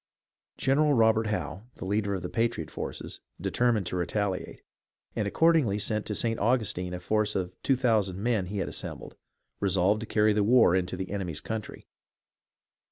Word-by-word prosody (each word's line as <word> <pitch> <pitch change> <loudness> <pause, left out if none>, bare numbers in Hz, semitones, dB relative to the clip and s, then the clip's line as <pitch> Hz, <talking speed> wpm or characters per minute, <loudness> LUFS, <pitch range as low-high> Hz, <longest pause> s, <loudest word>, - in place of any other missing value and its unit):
General 145 +2 +3
Robert 110 -1 +4
Howe, 105 -1 -3
the - - -7
leader 100 0 0
of 90 - -5
the - - -2
patriot 115 -8 -1
forces, - - -6 0.2
determined 120 -5 +1
to 90 - -3
retaliate, 95 +2 -2 0.5
and 105 - 0
accordingly 150 -6 +3
led 105 -1 -1
to 105 - -2
St. 115 +1 0
Augustine 100 -6 0
a - - -5
force 105 +3 0
of 90 -1 -2
two 135 - +3
thousand 110 -7 +1
men 105 -3 0
he 100 +3 -4
had 95 - -1
assembled, - - -7 0.4
resolved 100 +1 +2
to 115 - -6
carry 105 0 +3
the 105 0 +2
war 115 -4 +5
into 95 0 -1
the 95 0 -5
enemy's 90 -7 -3
country. 110 +4 -6
105 Hz, 165 wpm, -28 LUFS, 95-115 Hz, 0.5 s, war